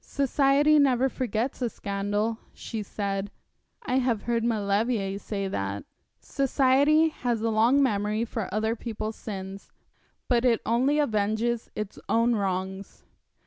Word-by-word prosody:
'Society 280 +2 +3
never 265 -2 +3
forgets 255 -1 -2
a 245 - +1
scandal,' 205 +3 -2 0.2
she 225 -2 -5
said; 200 -1 -3 0.5
'I 260 - 0
have 240 -5 0
heard 235 -1 0
Maulevrier 205 -2 0
say 200 -2 -3
that.' 100 - -3 0.3
'Society 280 +3 +3
has 240 -6 -2
a 230 - +1
long 235 +6 +4
memory 210 -1 0
for 220 -4 -4
other 220 +3 0
people's 220 -2 -5
sins, 195 -2 -7 0.6
but 240 -2 +2
it 240 -3 +3
only 260 +6 +2
avenges 220 -2 0
its 210 -1 -5
own 230 +1 +3
wrongs. 190 -1 -3
225 Hz, 130 wpm, -26 LUFS, 205-255 Hz, 0.6 s, long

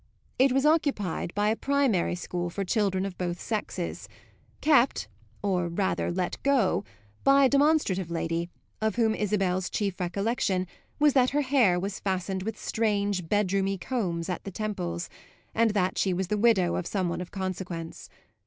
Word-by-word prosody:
It 265 +1 +5
was 270 +2 +2
occupied 280 - +1
by 205 +1 +2
a 220 - +2
primary 270 -11 +1
school 175 0 -3
for 195 +3 -3
children 195 -1 +1
of 195 -2 -6
both 175 -1 -2
sexes, 205 -5 -4 0.5
kept 280 -4 +3 0.4
or 180 -3 +1
rather 190 +3 -1
let 180 0 -2
go, 270 -8 +2 0.4
by 275 0 +6
a - - +4
demonstrative 280 - +2
lady 165 0 -2 0.3
of 220 0 0
whom 225 -2 +2
Isabel's 190 -3 0
chief 200 -3 -2
recollection 190 +1 0 0.3
was 295 -1 +4
that 255 -2 +4
her - - +4
hair 255 -10 +3
was 195 +2 -4
fastened 190 0 -2
with 215 +2 -4
strange 205 -5 0
bedroomy 195 -1 +1
combs 175 -9 -2
at 180 - -3
the - - -5
temples 185 - -3 0.5
and 230 0 +3
that 185 -2 +1
she 190 -2 +1
was 190 0 -2
the 210 - +1
widow 200 -6 +3
of 180 - -3
some 190 -3 -1
one 170 +1 -3
of 180 - -7
consequence. 180 -9 -5
195 Hz, 160 wpm, -27 LUFS, 180-225 Hz, 0.5 s, by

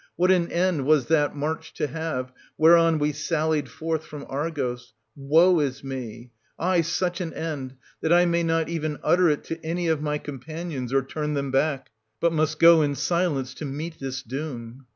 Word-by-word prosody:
What 180 +2 +3
an 175 -2 +2
end 170 -6 +1
was 150 -4 +4
that 150 -3 +2
march 160 +2 -4
to - - -1
have, 150 -4 -4 0.3
whereon 165 0 +6
we 150 0 +1
sallied 155 -1 -1
forth 160 +5 -3
from 150 -2 -9
Argos: 130 -5 -3 0.2
woe 160 +6 +4
is 140 -2 -2
me! 125 -3 -7
— - - -40
aye, 180 0 +2
such 175 +2 -1
an 165 -2 -5
end, 140 -5 -4 0.3
that 160 - 0
I 175 +1 +6
may 170 0 +1
not 165 -1 +1
even 155 -3 -3
utter 180 -1 +4
it 150 - 0
to 165 0 -6
any 170 +2 -2
of 160 -2 +1
my 150 0 -1
companions, 145 -1 -6
or 135 0 +2
turn 150 +2 -3
them 140 -1 -2
back, 135 -2 0 0.3
but 170 -1 +2
must 155 -1 0
go 165 0 +7
in 145 -1 0
silence 140 -2 0
to 150 - -7
meet 155 +4 -5
this 135 0 -5
doom. 125 -1 -7
155 Hz, 190 wpm, -25 LUFS, 135-165 Hz, 0.3 s, go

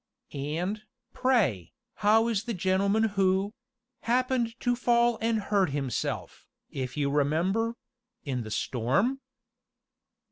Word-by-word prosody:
"And, 165 +9 -3 0.3
pray, 185 - +1 0.2
how 220 +2 +4
is 225 -2 -1
the 235 -3 -3
gentleman 195 +4 +2
who 195 -1 +1 0.5
happened 245 -1 0
to 245 -1 +1
fall 240 -1 +2
and 225 0 +1
hurt 200 -3 +1
himself, 135 -3 -3 0.2
if 130 0 -4
you 140 -1 +1
remember 175 +11 +1 0.5
in 130 -4 -2
the 110 - -7
storm?" 135 - 0
200 Hz, 110 wpm, -28 LUFS, 145-230 Hz, 0.5 s, how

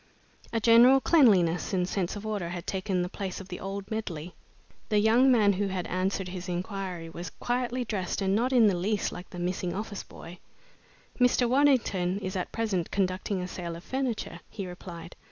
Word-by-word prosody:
A 230 - 0
general 235 +4 +7
cleanliness 200 - +4
and 180 -1 +1
sense 185 -1 -2
of 205 +1 -7
order 205 -6 -2
had 175 -1 -6
taken 190 -1 -1
the - - -2
place 190 0 -5
of 190 -1 -10
the 180 - -6
old 195 +2 -6
medley. 180 -7 -4 0.6
The 210 - +2
young 230 +5 +5
man 210 -5 +5
who 200 +2 -1
had 185 -2 -3
answered 185 +1 -1
his 180 0 -6
inquiry 180 -1 -4
was 170 +1 -7
quietly 245 +4 -2
dressed 195 -5 -2
and 195 -1 +1
not 245 +4 +1
in 245 -4 +6
the 200 -3 +4
least 200 +4 0
like 180 +1 -9
the - - -9
missing 175 0 -2
office 205 0 -4
boy. 175 +2 -12 0.8
"Mr. 250 0 +4
Waddington 235 -9 +2
is 190 -1 -4
at 180 - -3
present 210 -7 -1
conducting 185 0 -1
a - - -4
sale 175 -2 -5
of 170 - -10
furniture," 250 -10 -3
he 195 - -6
replied. 175 -1 -9
195 Hz, 190 wpm, -28 LUFS, 180-220 Hz, 0.8 s, general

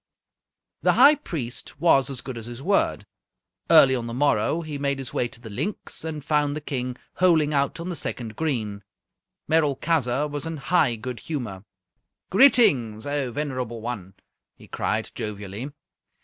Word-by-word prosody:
The - - +4
High 280 +4 +8
Priest 135 - -6
was 140 -6 +4
as 130 -3 -5
good 130 - -7
as 115 -1 -7
his 120 +2 -8
word. 195 +4 +1 0.6
Early 155 -5 +7
on 120 -2 -3
the 115 - -5
morrow 145 +3 +2
he 155 -3 -6
made 140 -1 0
his 135 -2 -6
way 120 - 0
to 120 0 -12
the 120 - -11
Linx, 145 - -3
and 155 -3 -5
found 150 -1 +1
the - - -3
King 125 -4 -4 0.2
holing 160 -5 +3
out 140 +3 0
on 170 +2 -5
the 180 - -3
second 115 -7 -3
green. 110 -10 -2 0.7
Merolchazzar 150 -3 +1
was 145 +2 -5
in 165 -1 -4
high 140 -4 +2
good 120 +1 -6
humour. 110 -10 -5 0.7
"Greetings, 145 - +4
O 145 -3 -1
venerable 130 -4 -3
one!" 105 -5 -6 0.4
he - - -16
cried, - - -2
jovially. 105 +4 -5
135 Hz, 160 wpm, -25 LUFS, 120-155 Hz, 0.7 s, High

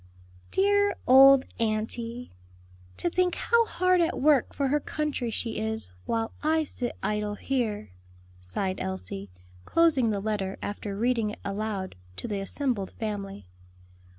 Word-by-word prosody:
"Dear 405 +1 +3
old 270 +1 +8
auntie! 230 +2 -2 0.7
to - - -1
think 360 +1 +1
how 465 -1 +3
hard 365 -1 +2
at 335 0 0
work 285 -3 +4
for 275 -2 -1
her 295 +2 +2
country 295 -5 -2
she 225 0 -3
is, 220 - -3 0.2
while 225 0 -1
I 315 +1 +2
sit 250 -4 -4
idle 210 0 -1
here," 215 - -2 0.5
sighed 185 - -3
Elsie, 95 +1 -5 0.3
closing 305 - +3
the 205 -2 0
letter 195 -2 -2
after 205 -1 -5
reading 230 -1 +1
it 210 - -7
aloud 200 -1 -3 0.2
to - - -4
the 205 -3 -2
assembled 205 -1 -2
family. 200 - -5
225 Hz, 135 wpm, -27 LUFS, 205-285 Hz, 0.7 s, old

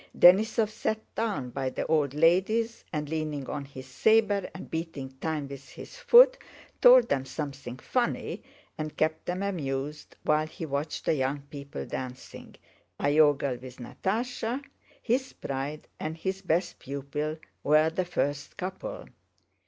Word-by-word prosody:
Denísov 215 +4 +6
sat 220 0 -1 0.2
down 205 - -2
by 135 +1 -2
the - - -3
old 145 -3 +1
ladies 190 +9 +3
and, 150 -2 -2
leaning 150 -3 -3
on 145 -1 -4
his 135 -1 -10
saber 205 - +3
and 190 - -8
beating 160 -5 -4
time 155 -3 -2
with 135 0 -10
his - - -10
foot, - - +7 0.4
told - - +8
them 135 - +1
something 135 -3 -6
funny 240 - -1 0.4
and 155 0 -4
kept 155 0 0
them 180 +2 -1
amused, 150 -6 -3
while 155 +1 +2
he 160 - -6
watched 145 +1 -3
the - - +3
young 140 0 0
people 140 -1 -6
dancing, 130 0 -7 0.4
Iogel 145 -3 +3
with 130 -1 -10
Natásha, 225 - -2 0.4
his 255 +3 0
pride 140 +2 -4
and 155 +1 -4
his 190 +3 -3
best 175 -1 0
pupil, 140 +3 -4 0.3
were 155 +2 +4
the 185 +3 0
first 145 -3 -2
couple. 185 -1 -5
155 Hz, 140 wpm, -28 LUFS, 140-195 Hz, 0.4 s, told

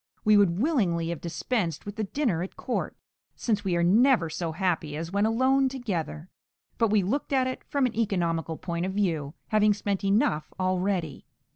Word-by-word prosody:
We 215 0 +6
would 195 -4 +4
willingly 195 - +1
have 170 -3 -4
dispensed 170 - -2
with 205 0 -6
the 220 - -2
dinner 215 - -1
at 185 - -6
court, - - -3 0.4
since 215 -4 -1
we 185 -3 0
are 170 - +2
never 215 - +4
so 165 +1 -3
happy 160 -4 -1
as 165 +2 -5
when 200 +2 +2
alone 260 +4 +3
together; 185 - -4 0.5
but 230 -2 +3
we 205 -2 +3
looked 270 +12 -2
at 265 -2 +3
it 255 0 -4
from 280 -2 0
an 250 - -2
economical 170 -7 -1
point 170 0 -3
of 190 - -4
view, 165 -7 -1
having 210 -1 +4
spent 200 -1 -2
enough 195 -6 +1
already. 185 -4 -1
195 Hz, 180 wpm, -27 LUFS, 170-225 Hz, 0.5 s, We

